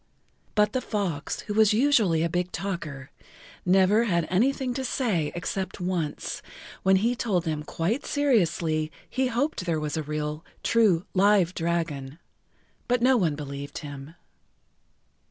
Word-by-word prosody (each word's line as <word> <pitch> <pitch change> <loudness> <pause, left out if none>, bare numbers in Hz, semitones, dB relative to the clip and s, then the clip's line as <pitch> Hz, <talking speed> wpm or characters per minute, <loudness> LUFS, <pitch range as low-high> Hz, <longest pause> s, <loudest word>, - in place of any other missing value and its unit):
But 210 0 +3
the 255 - 0
fox, 190 -12 -2
who 210 - -5
was 215 -1 +5
usually 220 - +3
a - - +2
big 180 +1 -2
talker, 155 -9 -5 0.6
never 195 +5 +4
had 170 -6 +1
anything 255 +6 +1
to 265 +1 -3
say 200 - 0
except 185 +2 -3
once, 175 -4 -2 0.4
when 190 0 +4
he 230 +6 +2
told 200 -8 0
them 155 -3 -2
quite 170 - -1
seriously[Pg 175 - +1
16] - - -10 0.2
he 260 0 0
hoped 250 -3 -1
there 165 -2 +1
was 150 0 -3
a - - 0
real, 150 +1 -3 0.2
true, 205 -7 +3
live 195 -2 +4
dragon. 165 -5 -2 0.7
But 245 -1 +1
no 260 +1 +5
one 170 -10 +2
believed 140 -1 -6
him. 145 +2 -9
180 Hz, 145 wpm, -26 LUFS, 155-220 Hz, 0.7 s, was